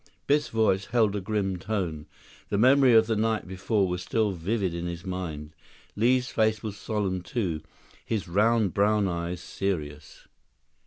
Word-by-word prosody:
Biff's 145 +1 +2
voice 105 -3 +1
held 110 -4 +2
a 100 - -2
grim 95 -1 -1
tone. 90 -6 -3 0.4
The 100 - 0
memory 130 +3 +5
of 110 0 +6
the 110 0 0
night 110 -2 0
before 95 +2 0
was 90 0 -3
still 110 +2 0
vivid 95 +1 -2
in 85 0 -4
his 85 0 -6
mind. 80 -5 -5 0.4
Li's 125 +3 +2
face 110 -1 +1
was 105 -3 -4
solemn, 100 -4 -2
too, 90 -5 -2 0.4
his 110 -4 -3
round 105 +2 +2
brown 105 0 +2
eyes 85 0 -3
serious. 75 -6 -5
100 Hz, 155 wpm, -27 LUFS, 90-110 Hz, 0.4 s, of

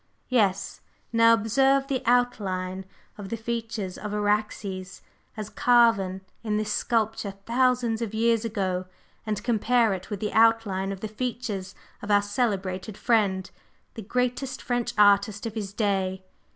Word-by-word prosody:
Yes! 200 -6 +1 0.3
Now 230 0 +6
observe 270 +5 +2
the 275 -2 -2
outline 190 -6 0 0.3
of 195 -2 -7
the 230 - -3
features 225 -4 -4
of 210 - -5
Araxes 205 -2 -2 0.3
as 215 -1 -4
carven 215 -4 +3 0.2
in 210 -2 0
this 215 0 -1
sculpture 220 -2 -1
thousands 245 -2 +1
of 225 -3 -2
years 230 0 +2
ago, 190 -5 -2 0.4
and 210 -1 -2
compare 235 -1 +2
it 185 0 -6
with 205 - -4
the 210 - -3
outline 220 -4 +3
of 195 -1 -6
the 220 - -3
features 215 -4 -4 0.3
of 205 - -7
our 205 -1 +4
celebrated 200 -3 -2
friend, 200 -5 +1 0.4
the 225 - -7
greatest 250 +4 -2
French 245 -1 -1
artist 205 +1 +4
of 225 - -4
his 210 -3 -4
day. 190 -3 -1
215 Hz, 140 wpm, -26 LUFS, 195-235 Hz, 0.4 s, Now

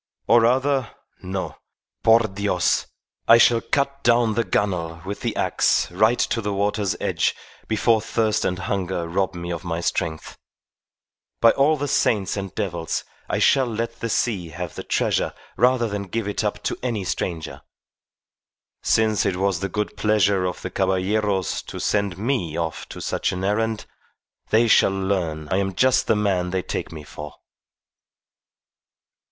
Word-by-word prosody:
Or 120 - +5
rather 130 +1 +1 0.3
no; 95 +1 -4 0.4
por 115 +1 +6
Dios! 100 -4 0 0.4
I 115 - +9
shall 115 0 +5
cut 140 +1 -1
down 120 -2 +3
the 115 +2 +1
gunwale 85 -7 -1
with 100 +1 -5
the - - -2
axe - - +1
right 110 +6 +3
to 115 - 0
the 105 -1 -2
water's 100 0 0
edge - - 0 0.3
before 110 0 +2
thirst 110 -1 0
and 90 - 0
hunger 90 -2 -2
rob 95 +2 -1
me 85 0 -5
of 85 - -4
my 85 -1 -3
strength. 85 -2 -3 1.0
By 115 - +7
all 150 +3 +3
the 145 +1 -2
saints 105 -7 +1
and 95 -3 -5
devils 85 -6 -2 0.3
I - - 0
shall 135 -2 +4
let 115 0 -4
the 115 - -3
sea 100 -7 0
have 85 +1 -6
the - - -6
treasure - - 0 0.2
rather 125 0 +3
than 100 -2 -4
give 110 +2 -3
it 105 - -2
up 105 - -2
to - - -2
any 115 -5 -2
stranger. 85 -3 -4 1.2
Since 110 -1 +2
it 100 -4 0
was 95 -1 0
the 100 +2 -3
good 105 +3 -3
pleasure 100 -3 +2
of 90 - -4
the 90 - -4
Caballeros 95 0 0
to - - -7
send 100 -4 0
me 100 - -1
off 80 -2 -3
on - - -7
such - - -1
an 90 +1 -4
errand, 110 +2 0 0.6
they 115 +2 +4
shall 110 - +5
learn 95 -6 -2
I 95 - +1
am 95 -1 -1
just 130 +5 +3
the 110 - +3
man 95 -4 0
they 95 0 -1
take - - -4
me 80 -2 -8
for." 75 +1 -9
100 Hz, 160 wpm, -23 LUFS, 90-115 Hz, 1.2 s, I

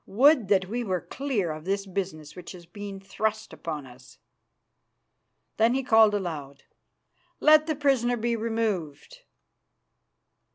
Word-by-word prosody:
Would 260 +1 +4
that 190 -2 +2
we 240 +5 -3
were 185 -5 -1
clear 250 - -2
of 155 0 -7
this 195 +1 -1
business 180 -6 -5
which 180 0 -9
has 175 -2 -12
been 205 +1 -8
thrust 215 +2 -3
upon 155 -4 -6
us." 125 0 -16 1.4
Then 230 +3 +3
he 270 - 0
called 220 -3 +5
aloud, 150 -8 -5 0.8
"Let 310 0 +6
the 310 - 0
prisoner 260 -4 +1
be 235 +1 -1
removed." 220 - -3
205 Hz, 130 wpm, -26 LUFS, 175-240 Hz, 1.4 s, Let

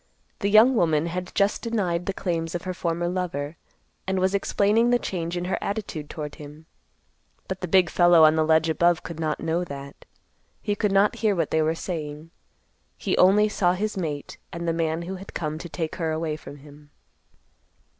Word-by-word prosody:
The 200 - 0
young 220 +5 +7
woman 160 -6 +2
had 180 +1 -4
just 200 +1 +2
denied 185 -7 -1
the - - +1
claims 165 -3 -2
of 175 - -3
her 185 - -3
former 170 -1 -2
lover, 170 -5 -3 0.5
and 190 0 0
was 185 +1 +1
explaining 210 +3 +2
the 245 - +4
change 175 -6 -4
in 175 - -3
her 185 - -1
attitude 200 -8 -4
toward 150 -3 -6
him; 150 +2 -11 0.8
but 190 -1 -5
the 180 - -3
big 185 +1 +4
fellow 175 -2 +5
on 155 0 +6
the 160 - +3
ledge 160 +1 +3
above 170 +1 +2
could 165 -1 -7
not 155 -2 -2
know 165 +2 0
that. 140 -2 -9 0.5
He 205 - -1
could 205 0 0
not 195 +1 +3
hear 215 -3 +1
what 165 -4 -1
they 160 - +2
were 160 +1 +1
saying. 155 -2 -6 0.7
He - - -1
only 205 +3 +5
saw 180 -4 +1
his 210 +3 -2
mate, 155 -6 -4
and 170 0 -5
the 165 - +1
man 165 0 -1
who 190 +2 -5
had 195 +2 -12
come 155 -1 -3
to 175 - -8
take 160 0 -4
her 160 -2 -1
from 145 - -10
him. 145 +1 -16
170 Hz, 195 wpm, -25 LUFS, 160-190 Hz, 0.8 s, young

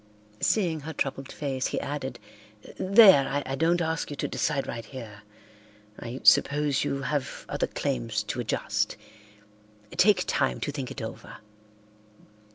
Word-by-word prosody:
Seeing 175 -7 +1
her 155 +2 -7
troubled 135 -1 -3
face, 135 -3 -2
he - - -2
added, 140 -4 -4 0.6
"There, 190 -8 +7 0.2
I 135 - -4
don't 165 +5 +2
ask 160 0 -2
you 145 - -5
to - - -2
decide 145 -3 -1
right 115 - -5
here. 110 -3 -10 0.8
I 120 +3 -7
suppose 145 -1 +4
you 140 0 -2
have 145 -2 -3
other - - -1
claims 115 -6 -2
to 105 +4 -4
adjust. 120 - -1 0.9
Take 210 +1 +4
time 130 -2 0
to 145 - -2
think 135 -3 -5
it 130 - -6
over." 110 - -8
140 Hz, 140 wpm, -27 LUFS, 130-155 Hz, 0.9 s, There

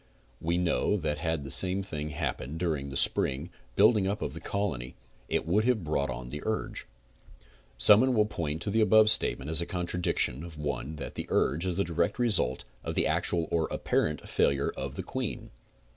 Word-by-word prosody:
We 85 +2 0
know 90 +3 +1
that 75 -4 -2
had 80 -2 -1
the 70 - -6
same 95 +4 +2
thing 75 -5 -5
happened 75 -1 -4
during 75 -6 -1
the 65 - -3
spring 70 +7 0 0.2
building 105 -5 +5
up 100 +2 -2
of 70 - -3
the 85 - -7
colony 80 -12 -3 0.3
it - - 0
would 100 +6 +2
have 120 -6 +2
brought 70 -3 -1
on 65 -2 -5
the 75 +3 -4
urge. 110 0 -3 0.9
Some 105 +1 +7
one 130 -1 +2
will 105 -1 +4
point 80 -6 -3
to 100 - -2
the 110 +2 +2
above 110 0 +6
statement 75 -7 +2
as 80 - +3
a - - -2
contradiction 85 -6 -1
of 85 -2 -9
the 75 - -8
one 75 +1 -3
that - - -7
the - - -5
urge 80 +8 +1
is 90 - -1
the 100 - +1
direct 85 +2 -1
result 105 - +2 0.2
of - - -4
the - - +2
actual 85 -2 +1
or 80 -2 +1
apparent 75 -1 -1
failure 70 0 +1
of - - -5
the - - -4
queen. - - -4
85 Hz, 200 wpm, -29 LUFS, 75-100 Hz, 0.9 s, Some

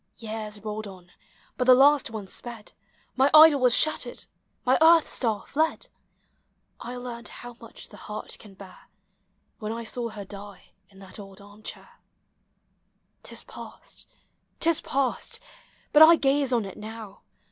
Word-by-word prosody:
Years 215 -2 -6
rolled 215 0 -5
on, 180 -2 -13 0.5
but 250 - 0
the 255 0 +8
last 285 +1 +5
one 220 -3 -6
sped 230 +2 -10 0.2
— - - -37
My 265 +2 +4
idol 305 -2 +9
was 250 -2 +4
shattered, 310 - -1 0.4
my 255 +1 +3
earth 325 0 +6
star 220 -5 -1
fled! 315 +3 -1 0.9
I 245 +1 -7
learnt 245 -1 -7
how 245 0 -10
much 230 - -11
the - - -13
heart 210 0 -7
can 205 -3 -15
bear, 190 -1 -14 0.7
WThen 215 0 -3
I 230 - -5
saw 235 +1 -4
her 210 -2 -8
die 200 -1 -11 0.2
in 195 -1 -18
her 190 -1 -13
old 195 0 -13
arm 205 +1 -16
chair. - - -10 1.2
'T - - -6
is - - -7
past, - - -10 0.5
't 335 - +4
is 325 - -1
past! 270 -2 -2 0.5
but 300 - +7
I 325 +2 +10
gaze 275 -2 +1
on 235 -4 +1
it 195 - -9
now. 215 -1 -9
230 Hz, 160 wpm, -26 LUFS, 205-265 Hz, 1.2 s, I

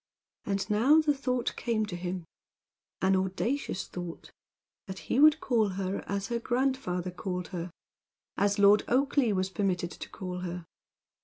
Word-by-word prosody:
And 195 -1 -1
now 245 +9 +5
the 305 -2 +3
thought 255 -3 -1
came 225 -3 0
to 200 -4 -6
him 175 0 -4 0.8
an 190 0 +4
audacious 190 +4 -1
thought 175 -2 -7 0.6
that 190 0 -6
he 245 - -1
would 310 +1 +7
call 225 -7 +2
her 195 0 -2
as 200 0 -2
her 235 -1 -1
grandfather 240 -8 -1
called 180 -1 -4
her; 175 -1 -4 0.7
as 205 +1 +1
Lord 205 +1 +6
Oakleigh 260 -3 +2
was 185 0 -1
permitted 185 -4 -1
to - - -8
call 180 -1 -6
her. 180 -1 -5
200 Hz, 150 wpm, -29 LUFS, 180-240 Hz, 0.8 s, would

